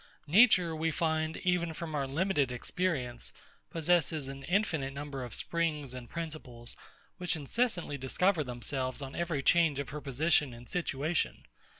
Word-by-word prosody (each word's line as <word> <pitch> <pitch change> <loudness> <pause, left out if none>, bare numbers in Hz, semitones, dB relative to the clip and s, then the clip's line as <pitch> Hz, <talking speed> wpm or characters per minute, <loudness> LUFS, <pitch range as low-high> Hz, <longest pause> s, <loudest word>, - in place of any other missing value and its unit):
Nature, 180 -1 +6
we 160 +1 0
find, 160 -1 0
even 175 -3 +1
from 165 -1 -5
our 140 -2 0
limited 145 -2 +1
experience, 125 -2 -1 0.4
possesses 160 -3 +2
an 135 0 -7
infinite 160 -7 +1
number 140 -2 -5
of 120 -3 -6
springs 155 -6 -1
and 125 -2 -8
principles, 150 -8 -5 0.4
which 180 -1 +1
incessantly 165 - -1
discover 165 +6 +2
themselves 130 +1 -3
on 135 0 -7
every 170 -5 -1
change 165 -3 +4
of 140 -3 -3
her 150 +3 -5
position 145 -1 +2
and 120 +1 -12
situation. 160 -2 -1
150 Hz, 140 wpm, -31 LUFS, 135-170 Hz, 0.4 s, Nature